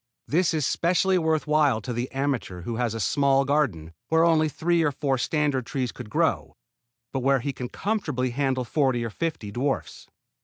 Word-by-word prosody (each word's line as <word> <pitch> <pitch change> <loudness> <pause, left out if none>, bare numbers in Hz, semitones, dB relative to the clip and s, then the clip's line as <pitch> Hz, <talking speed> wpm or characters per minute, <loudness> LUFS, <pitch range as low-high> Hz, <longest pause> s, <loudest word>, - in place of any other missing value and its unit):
This 170 +1 +2
is 150 -4 0
specially 180 +4 +2
worth 160 -2 +1
while 150 -6 +3
to 125 - -4
the 120 +2 -3
amateur 135 -10 -2
who 115 +6 -4
has 120 -2 -1
a - - -3
small 135 +5 +2
garden 120 - 0
where 160 0 +3
only 155 -2 +3
three 170 +3 +1
or 155 -3 +2
four 135 -2 -1
standard 145 -4 0
trees 130 -3 -2
could - - -9
grow, - - 0 0.6
but 135 - 0
where 135 +1 +3
he 140 +2 -3
can 125 -1 -6
comfortably 150 - -2
handle 130 0 0
forty 130 -2 +1
or 115 - -4
fifty 150 -8 -3
dwarfs. 135 +5 -3
135 Hz, 185 wpm, -25 LUFS, 125-155 Hz, 0.6 s, while